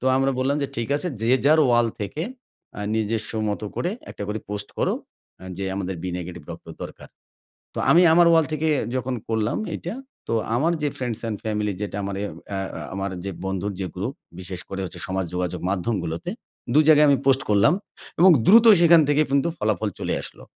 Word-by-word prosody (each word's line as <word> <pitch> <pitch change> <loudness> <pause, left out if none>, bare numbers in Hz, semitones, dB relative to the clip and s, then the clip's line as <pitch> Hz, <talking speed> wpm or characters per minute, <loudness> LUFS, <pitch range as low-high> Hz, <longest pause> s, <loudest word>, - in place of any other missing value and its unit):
তো - - -7
আমরা 135 0 +2
বললাম 135 +3 +1
যে - - 0
ঠিক 115 0 -2
আছে, 160 +5 -2
যে 115 - +1
যার 155 +2 +5
ওয়াল 120 -1 +4
থেকে 105 +10 -3 0.6
আ - - -4
নিজস্ব 110 0 -1 0.2
মত 105 - -3
করে 175 - -1 0.2
একটা - - -7
করে 105 +1 -2
পোস্ট 100 0 -4
করো - - +1 0.5
আ - - -10
যে 100 - -2
আমাদের 95 -1 -3
'বি 90 - -3
নেগেটিভ' 85 -3 -8
রক্ত - - -9 0.2
দরকার। - - -9 0.7
তো - - -10
আমি 170 - +7
আমার 175 +1 +6
ওয়াল 165 -1 +5
থেকে 155 +1 -1 0.3
যখন 130 0 -2
করলাম 110 -1 0 0.2
এটা - - -5 0.3
তো - - -1 0.2
আমার 155 +8 +2
যে 150 - +1
ফ্রেন্ডস 120 -4 -3
অ্যান্ড 110 -2 -3
ফ্যামিলি 105 -1 -1
যেটা 100 -1 -4
আমার 100 0 -3
এ - - -1 0.2
অ্যা 100 -1 -3
অ্যা - - -6
আমার 95 0 -3
যে 100 - -2
বন্ধুর 95 +1 -2
যে 95 - -2
গ্রুপ 100 +9 -3 0.3
বিশেষ 90 -1 -5
করে 95 0 -4
হচ্ছে 90 -1 -6
সমাজ 95 0 -1
যোগাযোগ 90 0 -2
মাধ্যমগুলোতে 90 - -2 0.4
২ 155 +2 +6
জায়গায় 150 -1 +7
আমি 140 - +5
পোস্ট 135 0 +4
করলাম 105 +8 +5 0.5
এবং 185 +3 +8 0.2
দ্রুত 230 +4 +7 0.2
সেখান 170 -1 +7
থেকে 145 +1 +4
কিন্তু 140 +4 +2
ফলাফল 110 -1 0
চলে - - -1
আসলো। - - -10
110 Hz, 200 wpm, -23 LUFS, 100-140 Hz, 0.7 s, এবং